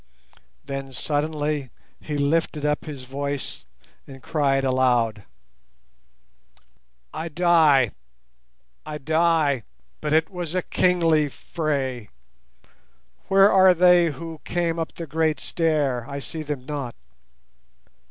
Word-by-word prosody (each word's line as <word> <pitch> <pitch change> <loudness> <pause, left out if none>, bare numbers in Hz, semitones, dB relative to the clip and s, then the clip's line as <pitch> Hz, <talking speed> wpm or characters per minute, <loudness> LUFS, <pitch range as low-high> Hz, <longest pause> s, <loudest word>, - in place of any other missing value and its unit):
Then 135 -1 -6
suddenly 145 +2 -2 0.3
he 150 -1 -4
lifted 150 +1 0
up 150 0 0
his 145 -4 -7
voice 140 +2 -5 0.4
and 135 -2 -12
cried 140 -3 +1
aloud— 125 -5 +1 1.9
"I 160 +2 -4
die, 155 - +4 0.9
I 150 -1 -6
die—but 150 - -1
it 160 +3 +2
was 175 -2 -5
a 185 - 0
kingly 165 -5 +2
fray. 135 -8 -3 1.2
Where 195 +1 +6
are 190 -1 +6
they 180 0 +5
who 160 +1 -8
came 170 -1 -1
up 165 - -3
the 170 - -6
great 155 +1 0
stair? 145 -7 -1
I 140 - -5
see 160 +3 -6
them 145 -4 -5
not. 140 -4 -5
150 Hz, 105 wpm, -24 LUFS, 135-165 Hz, 1.9 s, Where